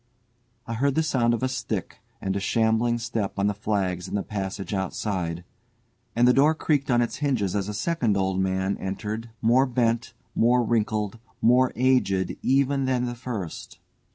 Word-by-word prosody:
I 115 Hz, -, -4 dB
heard 135 Hz, +4 st, +1 dB
the 160 Hz, -, +3 dB
sound 120 Hz, -6 st, +2 dB
of 120 Hz, -, -5 dB
a -, -, +3 dB
stick 115 Hz, -7 st, -4 dB, 0.2 s
and 95 Hz, -1 st, -2 dB
a -, -, 0 dB
shambling 110 Hz, +3 st, +2 dB
step 115 Hz, -4 st, -3 dB
on 100 Hz, -, +1 dB
the 105 Hz, -, +2 dB
flags 95 Hz, -4 st, -1 dB
in -, -, -4 dB
the 100 Hz, -, 0 dB
passage 100 Hz, -1 st, -4 dB
outside, 95 Hz, -3 st, -2 dB, 0.7 s
and 120 Hz, +1 st, +4 dB
the 125 Hz, -, +6 dB
door 150 Hz, +4 st, +4 dB
creaked 145 Hz, -3 st, 0 dB
on 120 Hz, -1 st, +4 dB
its 120 Hz, -, -4 dB
hinges 125 Hz, -10 st, 0 dB
as 100 Hz, 0 st, -1 dB
a -, -, -3 dB
second 120 Hz, -7 st, 0 dB
old 95 Hz, -1 st, 0 dB
man 95 Hz, +1 st, 0 dB
entered, 105 Hz, +4 st, -4 dB
more 125 Hz, +4 st, +4 dB
bent, 120 Hz, -1 st, 0 dB, 0.2 s
more 120 Hz, +2 st, +3 dB
wrinkled, 110 Hz, -1 st, 0 dB, 0.2 s
more 125 Hz, +2 st, +4 dB
aged 105 Hz, -8 st, +2 dB
even 135 Hz, +1 st, +2 dB
than 125 Hz, -1 st, +1 dB
the 120 Hz, -, -3 dB
first. 115 Hz, -8 st, -6 dB
115 Hz, 175 wpm, -25 LUFS, 100-125 Hz, 0.7 s, the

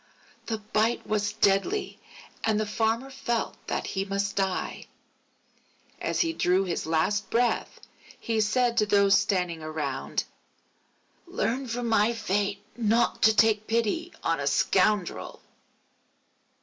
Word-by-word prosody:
The 225 Hz, -, -1 dB
bite 215 Hz, +2 st, 0 dB
was 210 Hz, -1 st, -1 dB
deadly 220 Hz, -, +1 dB, 0.4 s
and 220 Hz, -1 st, +2 dB
the 215 Hz, -, 0 dB
Farmer 225 Hz, +5 st, -1 dB
felt 240 Hz, -3 st, -2 dB
that -, -, -2 dB
he 195 Hz, -, -2 dB
must 200 Hz, +1 st, -2 dB
die. 190 Hz, -2 st, -2 dB, 1.1 s
As -, -, 0 dB
he 330 Hz, -2 st, +1 dB
drew 185 Hz, -, +2 dB
his 175 Hz, -4 st, -3 dB
last 195 Hz, +6 st, 0 dB
breath, 240 Hz, +1 st, 0 dB, 0.4 s
he 225 Hz, -1 st, 0 dB
said 235 Hz, +2 st, +1 dB
to 210 Hz, -2 st, +3 dB
those 200 Hz, -1 st, +4 dB
standing 180 Hz, -4 st, -1 dB
around: 155 Hz, -3 st, -3 dB, 1.1 s
_Learn 265 Hz, -7 st, -2 dB
from 240 Hz, +1 st, -2 dB
my 225 Hz, 0 st, +3 dB
fate 205 Hz, -2 st, -1 dB
not 230 Hz, 0 st, +1 dB
to 220 Hz, -1 st, +5 dB
take 215 Hz, 0 st, +3 dB
pity 235 Hz, +10 st, 0 dB
on 165 Hz, -2 st, +1 dB
a 140 Hz, -, -2 dB
scoundrel. 190 Hz, +3 st, +1 dB
215 Hz, 125 wpm, -27 LUFS, 195-230 Hz, 1.1 s, to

